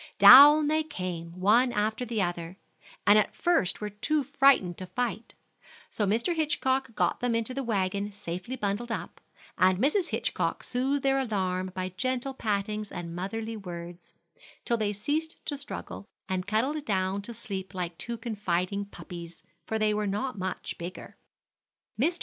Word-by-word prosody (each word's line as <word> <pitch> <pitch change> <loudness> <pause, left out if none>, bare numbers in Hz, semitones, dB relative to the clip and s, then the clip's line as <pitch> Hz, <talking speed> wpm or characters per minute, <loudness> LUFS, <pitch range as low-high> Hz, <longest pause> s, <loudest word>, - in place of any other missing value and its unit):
Down 295 +3 +10
they 310 +1 +2
came, 180 - -6
one 230 +7 +4
after 220 +2 -1
the 225 -4 0
other, 175 0 -4 0.5
and 210 +1 +7
at 210 - -1
first 340 - +1
were 210 0 -3
too 295 +9 0
frightened 270 -9 +4
to 185 - -6
fight; 235 +3 -3 0.6
so 210 - -1
Mr. 230 - +1
Hitchcock 265 -5 0
got - - +1
them 245 -2 0
into 230 +2 -1
the 275 - -2
wagon 200 -3 -1
safely 200 +4 -6
bundled 220 +1 -2
up, - - -5 0.4
and 185 0 +5
Mrs. 305 - +1
Hitchcock - - -1
soothed 270 +3 -1
their 270 0 +3
alarm 185 -6 -1
by 185 0 -2
gentle 255 +2 -1
pattings 210 -2 -2
and 170 -1 -6
motherly 220 +5 -4
words, 175 -3 -9 0.5
till 235 - +2
they 215 -2 0
ceased 290 +11 -2
to 290 - -2
struggle, 280 -7 -7 0.2
and 185 0 -2
cuddled 260 +8 0
down 190 -2 0
to 205 - -8
sleep 200 -4 -6
like 175 -2 -3
two 235 +4 -3
confiding 200 -3 -2
puppies, 175 -4 -10 0.2
for 220 - -1
they 215 -1 +2
were 210 0 -1
not 210 +6 -2
much 185 -2 -5
bigger. 175 +2 -8 0.9
Mr. 340 +5 +1
215 Hz, 160 wpm, -28 LUFS, 185-255 Hz, 0.9 s, Down